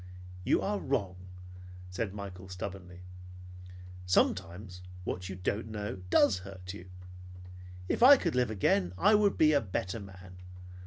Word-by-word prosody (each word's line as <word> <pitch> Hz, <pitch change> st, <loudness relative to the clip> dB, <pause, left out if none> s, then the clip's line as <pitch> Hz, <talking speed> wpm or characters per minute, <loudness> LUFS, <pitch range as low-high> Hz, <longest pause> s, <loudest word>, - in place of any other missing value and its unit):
"You -, -, +2 dB
are 205 Hz, 0 st, -1 dB
wrong," 105 Hz, -9 st, -1 dB, 0.8 s
said 95 Hz, +2 st, -3 dB
Michael 95 Hz, -2 st, -8 dB
stubbornly. 90 Hz, -1 st, -7 dB, 1.1 s
"Sometimes 90 Hz, +1 st, 0 dB, 0.2 s
what 90 Hz, +1 st, -4 dB
you 95 Hz, -, -5 dB
don't 100 Hz, +4 st, -2 dB
know 105 Hz, -2 st, -5 dB
does 100 Hz, -3 st, +4 dB
hurt 95 Hz, -1 st, -9 dB
you. 95 Hz, -2 st, -11 dB, 1.0 s
If -, -, -1 dB
I 275 Hz, +3 st, +10 dB
could 170 Hz, -8 st, -1 dB
live 125 Hz, -2 st, +1 dB
again, 95 Hz, -3 st, +1 dB
I 205 Hz, -, +4 dB
would 210 Hz, -1 st, +3 dB
be 155 Hz, -1 st, +5 dB
a 140 Hz, -, +4 dB
better 95 Hz, +1 st, -3 dB
man. 95 Hz, -2 st, -12 dB
95 Hz, 140 wpm, -31 LUFS, 90-115 Hz, 1.1 s, I